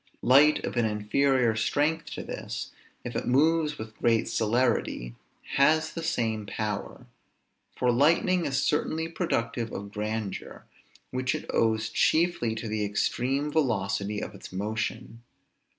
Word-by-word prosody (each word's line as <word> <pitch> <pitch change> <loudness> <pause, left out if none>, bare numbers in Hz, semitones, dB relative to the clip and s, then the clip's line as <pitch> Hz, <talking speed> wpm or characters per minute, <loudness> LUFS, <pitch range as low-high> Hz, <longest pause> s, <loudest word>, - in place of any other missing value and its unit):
Light 145 +4 +5
of - - -4
an 120 - +3
inferior 115 +3 +2
strength 150 +8 +1
to - - -5
this, - - -6 0.3
if - - -6
it - - -2
moves 150 +3 +3
with 110 0 -8
great 115 -1 +2
celerity, 115 - 0 0.4
has 155 +3 +3
the 165 - -4
same 115 -10 -1
power; 105 -2 -4 0.7
for 125 -1 +2
lightning 165 +7 +3
is 135 0 0
certainly 160 +2 0
productive 120 -9 -2
of 100 0 -6
grandeur, 105 -1 -4 0.5
which 130 0 -1
it - - -5
owes 110 -1 +2
chiefly 155 -2 +2
to 115 0 -5
the 105 0 -1
extreme 130 +7 0
velocity 105 -7 0
of - - -6
its 100 - -11
motion. 110 +3 -4
120 Hz, 135 wpm, -27 LUFS, 110-150 Hz, 0.7 s, Light